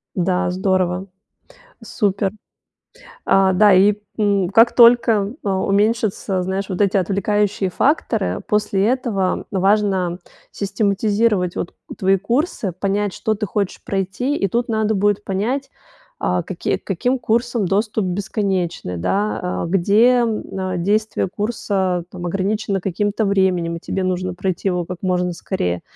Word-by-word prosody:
Да, 180 0 0
здорово, 185 0 0 0.8
супер. 200 -2 0 1.0
А, 195 -1 +4
да, 205 +1 +5
и, 200 +3 +5 0.2
м, 200 -3 +2
как 225 +5 +5
только, 230 -3 +5
а, 195 -2 0
уменьшатся, 200 -2 +1
знаешь, 190 +2 -3
вот 185 - -4
эти 200 -1 +3
отвлекающие 200 +1 0
факторы, 290 - 0
после 210 -2 +1
этого 230 -6 0
важно 195 -2 +1 0.3
систематизировать 200 -1 0
вот 170 - -4 0.2
твои 195 +1 +3
курсы, 230 - -1
понять, 200 +2 -1
что 220 - -1
ты 210 +1 -3
хочешь 200 0 -3
пройти. 195 +9 -2
И 195 - 0
тут 235 +5 -1
надо 220 -1 +1
будет 205 +1 +1
понять, 240 +9 -2 0.5
а, - - 0
какие, - - -2
к - - -34
каким 255 +1 0
курсам 235 -2 0
доступ 210 0 0
бесконечный, 185 - -2
да, 180 - -1
а, - - -2
где, 195 +5 +3 0.2
н 190 -5 -3
действие 210 +1 0
курса, 190 -4 -1
там, 180 -1 -8
ограничено 195 +2 -1
каким-то 205 +4 -1
временем, 185 -4 +1
и 165 - -8
тебе 190 - -3
нужно 185 0 -1
пройти 185 +1 -2
его 180 -2 -1
как 180 -1 -7
можно 180 -1 0
скорее. 90 - -3
195 Hz, 135 wpm, -20 LUFS, 185-210 Hz, 1.0 s, да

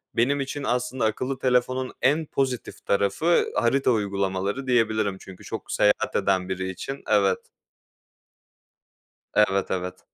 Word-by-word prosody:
benim 140 +5 +2
için 140 +1 -4
aslında 125 -1 -1
akıllı 130 +4 -2
telefonun 130 0 +1
en 150 +4 +3
pozitif 130 -4 -3
tarafı 100 - +2
harita 130 +2 +2
uygulamaları, 100 +3 -1
diyebilirim 110 -5 +1
çünkü 95 -1 -12
çok - - -6
seyahat 105 0 +2
eden 95 -2 +1
biri 95 0 -2
için 135 +9 -6
evet. 100 -3 +3 1.9
Evet, 100 -2 +2
evet. 90 -1 -3
115 Hz, 120 wpm, -25 LUFS, 100-130 Hz, 1.9 s, en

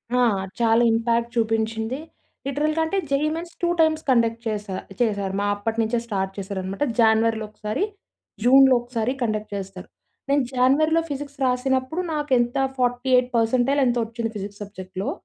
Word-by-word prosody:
ఆ! - - +3 0.4
చాలా 230 0 +4
ఇంపాక్ట్ 230 +1 +1
చూపించింది. 225 +2 0 0.5
లిటరల్‌గా 305 +3 0
అంటే, 390 +5 -1
JEE 280 +2 +1
mains 335 +1 -7
two 345 - +2
times 315 0 +3
conduct 230 -2 +3
చేసా 210 -3 -3 0.3
చేసారు 200 -4 0
మా 205 - 0
అప్పటినుంచే 225 +2 -1
స్టార్ట్ 195 -3 -2
చేశారనమాట. 195 +3 -3 0.2
జానివరిలో 220 0 +3
ఒకసారి, 215 - -3 0.6
జూన్‌లో 265 +1 +7
ఒకసారి 240 0 -2
కండక్ట్ 215 -3 -2
చేస్తారు. 195 -2 -7 0.4
నేను 280 -1 +3
జానివరిలో 295 +6 +3
ఫిజిక్స్ 285 0 -6
రాసినప్పుడు 260 +5 0
నాకు 295 -2 -3
ఎంత 240 0 0 0.2
48% 250 +1 +2
ఎంతొ 245 -1 +1
వచ్చింది 230 0 -4
ఫిజిక్స్ 205 0 -7
సబ్జెక్ట్‌లో. 190 -1 -6
235 Hz, 135 wpm, -23 LUFS, 220-265 Hz, 0.6 s, జూన్‌లో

